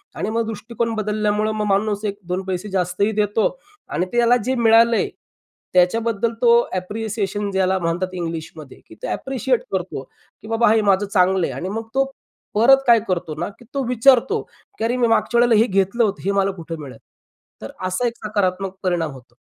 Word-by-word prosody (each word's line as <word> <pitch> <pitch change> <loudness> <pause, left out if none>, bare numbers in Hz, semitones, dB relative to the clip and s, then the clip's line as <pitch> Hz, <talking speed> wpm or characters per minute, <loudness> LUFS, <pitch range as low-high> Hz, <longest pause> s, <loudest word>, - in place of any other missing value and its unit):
आणि - - -3
मग 230 +1 0
दृष्टिकोन 230 +1 -3
बदलल्यामुळं 210 0 0
मग 215 -1 -2
माणूस 205 +1 0
एक 200 -1 -2
दोन 180 +1 -1
पैसे 190 +2 -4
जास्तही 190 +2 0
देतो 210 +1 +2 0.4
आणि 180 - -1
त्याला 240 0 +4
जे 260 +1 0
मिळालंय 230 -1 +4 0.6
त्याच्याबद्दल 225 +5 +2
तो 240 -2 +5 0.2
ॲप्रिसिएशन 205 +1 -3
ज्याला 190 0 +1
म्हणतात 175 +2 -2
इंग्लिशमध्ये, 165 -4 -6
की - - -14
तो - - -7
ॲप्रिशिएट 265 -2 -1
करतो, 185 -6 -3 0.4
की - - -12
"बाबा 225 0 +3
हे 225 - +3
माझं 200 -1 +2
चांगलं 190 -2 +2
आहे" - - -5
आणि 185 - -4
मग 225 +2 -4
तो 270 +1 +2 0.5
परत 240 +6 +7
काय 235 -1 +7
करतो 170 -4 -2
ना, - - -2
की 240 - -16
तो 275 -1 -1
विचारतो, 255 - +4 0.4
की - - -4
"अरे, 240 +2 0
मी 240 -1 +3
मागच्या 230 +1 +2
वेळेला 240 -1 +5
हे 230 - +3
घेतलं 195 +4 +1
होतं, 205 -3 -1
हे 200 - +2
मला 195 0 +1
कुठं 165 -3 -8
मिळल?" 135 -3 -9 0.6
तर 110 - -7 0.2
असा 185 +7 0
एक 235 - -4
सकारात्मक 195 -2 -1
परिणाम 175 -4 0
होतो. 125 -3 -15
205 Hz, 180 wpm, -21 LUFS, 185-230 Hz, 0.6 s, परत